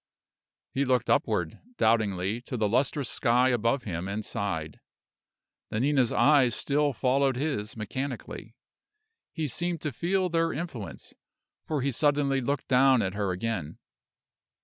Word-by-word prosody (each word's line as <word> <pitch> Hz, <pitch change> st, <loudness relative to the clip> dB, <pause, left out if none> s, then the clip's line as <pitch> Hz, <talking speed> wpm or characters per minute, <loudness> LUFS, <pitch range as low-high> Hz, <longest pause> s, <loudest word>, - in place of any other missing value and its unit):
He 135 Hz, -, +1 dB
looked 125 Hz, -3 st, +1 dB
upward, 85 Hz, -3 st, 0 dB, 0.2 s
doubtingly, 110 Hz, -1 st, +1 dB
to 125 Hz, -, -3 dB
the 110 Hz, -2 st, +1 dB
lustrous 135 Hz, +4 st, +1 dB
sky 125 Hz, +4 st, +2 dB
above 120 Hz, +2 st, +1 dB
him, 90 Hz, -2 st, -4 dB
and 105 Hz, +2 st, -4 dB
sighed. 80 Hz, -8 st, -3 dB, 0.9 s
Nanina's 130 Hz, +2 st, +2 dB
eyes 135 Hz, -6 st, +4 dB
still 145 Hz, +1 st, +1 dB
followed 135 Hz, +1 st, +1 dB
his 125 Hz, -7 st, -2 dB
mechanically. 130 Hz, +5 st, -5 dB, 0.8 s
He 160 Hz, -2 st, -2 dB
seemed 170 Hz, +6 st, -2 dB
to 150 Hz, -, -2 dB
feel 185 Hz, +8 st, 0 dB
their 165 Hz, -1 st, 0 dB
influence, 140 Hz, -, -6 dB, 0.5 s
for 150 Hz, -3 st, -1 dB
he 140 Hz, -, +1 dB
suddenly 140 Hz, 0 st, +1 dB
looked 140 Hz, +2 st, -2 dB
down 130 Hz, -1 st, +4 dB
at 95 Hz, -1 st, -2 dB
her 100 Hz, -1 st, -1 dB
again. 90 Hz, -5 st, -3 dB
125 Hz, 130 wpm, -28 LUFS, 110-140 Hz, 0.9 s, eyes